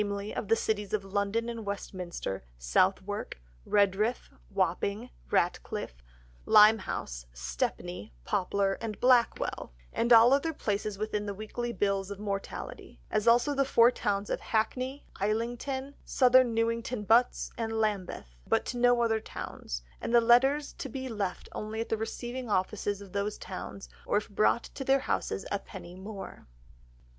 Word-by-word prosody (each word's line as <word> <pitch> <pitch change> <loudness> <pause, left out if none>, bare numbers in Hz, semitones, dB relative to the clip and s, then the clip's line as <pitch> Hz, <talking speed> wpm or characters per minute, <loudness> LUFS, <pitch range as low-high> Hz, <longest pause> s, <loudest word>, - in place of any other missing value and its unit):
of - - -3
the 225 - +4
Cities 210 -3 -2
of 200 -2 0
London 200 +4 -1
and 230 -1 -5
Westminster, 185 - -5
Southwark, - - 0 0.3
Redriff, 205 +4 +2 0.2
Wapping, 200 +4 -1 0.2
Ratcliff, 170 - -1 0.5
Limehouse, 210 - +4
Stepney, 65 - -3
Poplar, 195 +1 0
and 220 -2 -4
Blackwall, 245 - +2 0.2
and 235 - 0
all 235 +2 +8
other 320 +4 +1
places 205 -5 -2
within 210 0 -2
the 200 - -3
weekly 235 +3 -4
Bills 200 -3 0
of 200 - -5
Mortality, 200 - -5
as 215 +2 0
also 240 +5 +5
the 275 -1 +2
four 240 -2 +5
towns 205 -4 -1
of - - 0
Hackney, 255 +5 -1
Islington, 240 +6 -2
South 255 -2 +2
Newington 230 -2 +3
Butts, 230 +4 +3
and 225 -1 -3
Lambeth, 205 - -2
but - - +2
to 245 - -3
no 245 0 +4
other 225 -1 +2
towns, - - -6 0.2
and 235 - 0
the - - +9
letters 265 +5 +4
to 270 - -4
be 260 +2 -5
left 200 -5 -3
only 215 +1 -5
at 230 - -3
the - - +2
receiving 240 +2 -5
offices 205 +1 0
of 195 -2 -11
those 200 +1 -1
towns, 190 +1 -7 0.2
or - - +2
if 205 - -3
brought 215 +3 +3
to 270 - -7
their 270 0 +3
Houses 195 - -2
a 200 - 0
penny 180 -3 -10
more." 195 +2 -9
215 Hz, 150 wpm, -30 LUFS, 195-240 Hz, 0.5 s, the